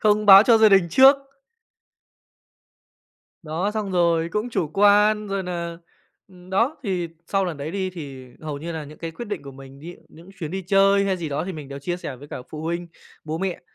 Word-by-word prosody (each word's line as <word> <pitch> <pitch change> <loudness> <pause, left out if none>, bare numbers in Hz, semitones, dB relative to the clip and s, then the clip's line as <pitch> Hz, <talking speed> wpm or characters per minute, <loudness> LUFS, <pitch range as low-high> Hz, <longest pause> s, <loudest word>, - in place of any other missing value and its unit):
không 210 -1 +2
báo 195 0 +10
cho 230 -1 +5
gia 220 -1 +7
đình 195 -3 +4
trước. 265 - +7 2.3
Đó, 165 +6 -2
xong 210 -2 -4
rồi 170 -2 +2
cũng 215 +3 -2
chủ 165 -9 -1
quan, 210 +1 +4
rồi 195 -1 -2
nà 170 -2 -5 0.5
ừm, 180 -1 -17
đó, 230 +11 +1
thì 185 -6 -2 0.2
sau 195 +1 0
lần 175 -5 -4
đấy 145 +2 -5
đi 190 0 -3
thì 140 -7 -9
hầu 150 -2 -5
như 170 +3 -6
là 160 -2 -5
những 150 +1 -13
cái 165 - -5
quyết 200 +9 -8
định 200 -8 -4
của 140 - -10
mình, 135 0 -13
ví 170 +3 -9
dụ - - -22
những 170 +4 -16
chuyến 160 -6 -5
đi 190 +1 -4
chơi 195 +2 +3
hay 190 -1 0
gì 170 -3 -5
đó 145 +3 -3
thì 190 - -5
mình 150 -5 -9
đều 140 - -7
chia 175 +5 -3
sẻ 145 -7 -7
với 145 +3 -13
cả 125 - -7
phụ 155 0 -7
huynh, 170 +1 -3 0.4
bố 155 +1 -4
mẹ, 190 -1 -3
180 Hz, 225 wpm, -23 LUFS, 155-200 Hz, 2.3 s, báo